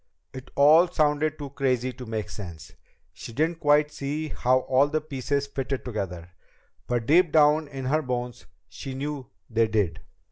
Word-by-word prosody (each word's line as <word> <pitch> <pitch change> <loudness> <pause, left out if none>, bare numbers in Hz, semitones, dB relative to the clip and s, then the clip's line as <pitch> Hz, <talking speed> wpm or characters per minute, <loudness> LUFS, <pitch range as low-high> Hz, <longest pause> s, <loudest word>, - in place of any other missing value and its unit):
It 130 0 -9
all 155 +5 +6
sounded 155 -1 +1
too 145 -2 -7
crazy 130 -2 0
to 125 -1 -10
make 110 -2 -4
sense. 85 -7 -9 0.4
She 115 - -9
didn't 160 +5 0
quite 150 0 +3
see 150 +3 -4
how 130 -1 +2
all 130 +2 +3
the 155 +1 0
pieces 140 -1 -2
fitted 135 -1 -4
together. 90 -7 -5 0.6
But 120 -2 -1
deep 165 +4 +4
down 150 0 +4
in 135 -2 -7
her 155 +4 +2
bones 125 -3 -4 0.2
she 135 -1 -8
knew 140 -1 -4 0.2
they 115 -1 +2
did! 100 -7 0
135 Hz, 165 wpm, -26 LUFS, 120-150 Hz, 0.6 s, all